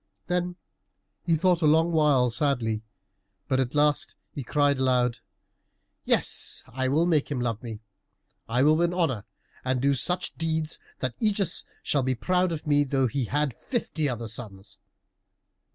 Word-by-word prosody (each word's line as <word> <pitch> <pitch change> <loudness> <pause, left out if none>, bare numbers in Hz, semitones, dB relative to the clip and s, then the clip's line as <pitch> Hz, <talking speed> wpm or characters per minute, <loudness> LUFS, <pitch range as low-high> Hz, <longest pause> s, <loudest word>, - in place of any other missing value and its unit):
Then 180 0 -1 0.7
he 165 -1 +1
thought 180 +1 +2
a 155 - +4
long 160 +3 +4
while 145 -6 +3
sadly, 120 -4 0 0.7
but 130 - +1
at 130 +1 -1
last 150 0 +2 0.2
he 140 - -5
cried 145 +2 +2
aloud, 125 -2 +2 0.9
"Yes, - - 0
I 130 +2 -3
will 150 +6 +2
make 160 -5 +1
him 140 -4 -2
love 115 -3 -2
me. 115 -3 -7 0.7
I 125 +3 +2
will 155 +2 +5
win 170 +1 +1
honor, 135 - 0 0.4
and 130 0 0
do 140 +2 +2
such 180 +7 +1
deeds 160 -1 0 0.2
that 130 -2 -3
Ægeus 200 -5 +1 0.2
shall 145 - +1
be 130 0 0
proud 180 +7 +1
of 160 -2 -5
me 145 -1 +3
though 135 -1 +1
he 130 +2 -1
had 145 +2 0
fifty 160 - -2
other 120 -2 -4
sons." 105 -3 -6
140 Hz, 155 wpm, -26 LUFS, 125-160 Hz, 0.9 s, will